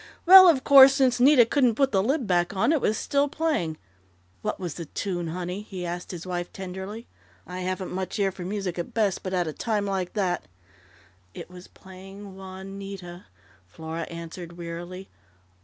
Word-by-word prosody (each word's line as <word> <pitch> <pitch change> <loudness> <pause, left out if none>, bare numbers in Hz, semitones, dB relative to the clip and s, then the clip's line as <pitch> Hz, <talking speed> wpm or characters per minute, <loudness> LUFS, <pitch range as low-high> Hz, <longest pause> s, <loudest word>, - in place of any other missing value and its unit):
"Well, 370 +1 +10
of 270 -6 +2
course, 275 -1 +8
since 260 -3 +2
Nita 255 -1 +6
couldn't 245 -1 +2
put 270 +2 +2
the 195 - +2
lid 265 +5 0
back 175 0 0
on, 225 +9 +2
it 315 -4 +1
was 215 - +1
still 280 0 +1
playing.... 295 - -1 0.6
What - - -3
was 175 -5 -4
the 170 - -7
tune, 175 +2 -4
honey?" 180 +3 -4
he 190 -4 -7
asked 175 +1 -5
his 175 -2 -7
wife 175 -1 -4
tenderly. 190 +4 -7 0.4
"I 180 0 -7
haven't 185 0 -4
much 185 +3 -4
ear 195 -2 +1
for 185 -1 -9
music 190 -2 -4
at 170 - -6
best, 205 -4 +1
but 185 - -5
at 180 -2 0
a 155 - -4
time 210 +1 -2
like 190 -2 -3
that 180 - -1 0.4
" 90 +1 -31
"It - - -9
was 180 0 -12
playing 195 +1 -12
Juanita," 190 -1 -9 0.4
Flora 160 - -6
answered 170 +1 -9
wearily. 175 +2 -7
190 Hz, 180 wpm, -25 LUFS, 175-215 Hz, 0.6 s, Well